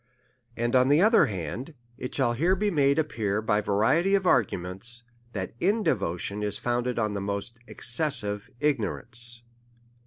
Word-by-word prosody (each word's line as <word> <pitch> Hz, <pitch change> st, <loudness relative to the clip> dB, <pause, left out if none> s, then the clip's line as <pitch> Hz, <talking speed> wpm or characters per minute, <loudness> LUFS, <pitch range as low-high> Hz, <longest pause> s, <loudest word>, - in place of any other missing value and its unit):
And, 120 Hz, +2 st, 0 dB
on 130 Hz, +1 st, +4 dB
the 145 Hz, +2 st, +5 dB
other 220 Hz, +5 st, +5 dB
hand, 110 Hz, -, -6 dB, 0.2 s
it 125 Hz, 0 st, -6 dB
shall 125 Hz, -4 st, +1 dB
here 170 Hz, +10 st, +2 dB
be 205 Hz, +1 st, 0 dB
made 140 Hz, -4 st, +2 dB
ap 155 Hz, -1 st, 0 dB
pear 105 Hz, -4 st, -1 dB
by 105 Hz, -1 st, +1 dB
variety 135 Hz, -, +2 dB
of 195 Hz, -1 st, 0 dB
arguments, 115 Hz, -, 0 dB, 0.3 s
that 95 Hz, -3 st, -4 dB
indevotion 105 Hz, -, 0 dB
is 105 Hz, -1 st, -1 dB
found 120 Hz, 0 st, -1 dB
ed 125 Hz, -, -2 dB
in 105 Hz, -3 st, 0 dB
the 100 Hz, -, -3 dB
most 100 Hz, +4 st, -4 dB
excessive 120 Hz, -7 st, +1 dB
ignorance. 120 Hz, -3 st, -1 dB
120 Hz, 155 wpm, -26 LUFS, 105-150 Hz, 0.3 s, the